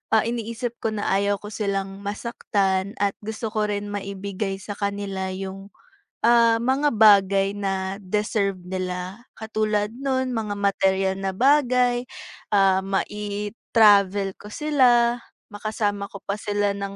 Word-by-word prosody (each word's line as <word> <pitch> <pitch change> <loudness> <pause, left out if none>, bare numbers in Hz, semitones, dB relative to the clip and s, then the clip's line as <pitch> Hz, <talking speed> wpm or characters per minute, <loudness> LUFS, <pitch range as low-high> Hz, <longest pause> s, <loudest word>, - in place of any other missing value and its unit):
ah, 220 - +4
iniisip 235 +1 -4
ko 220 -1 -2
na 205 - -3
ayaw 200 +1 +2
ko 205 - -8
silang 195 -2 -2
masaktan 200 -1 -1
at 200 -1 +3
gusto 220 +1 -4
ko 215 -1 +1
rin 205 0 -2
maibigay 200 0 -4
sa 205 - -6
kanila 200 -2 -3
'yong, 195 +1 -7 0.6
ah, 230 -1 +5
mga 270 +4 +2
bagay 200 -2 +5
na 195 -1 -2
deserve 200 -1 -1
nila, 185 +3 -4
katulad 215 -1 -1
no'n, 260 -1 -1
mga 210 -2 -2
materyal 195 -1 +1
na 195 0 -1
bagay, 250 -2 +3 0.5
ah, 195 -2 +4
mai-travel 205 -1 +2
ko 210 - -11
sila, 245 -5 +3 0.3
makasama 205 -1 -2
ko 200 - -8
pa 200 - -2
sila 205 -1 0
nang 200 0 -5
205 Hz, 130 wpm, -24 LUFS, 195-225 Hz, 0.6 s, ah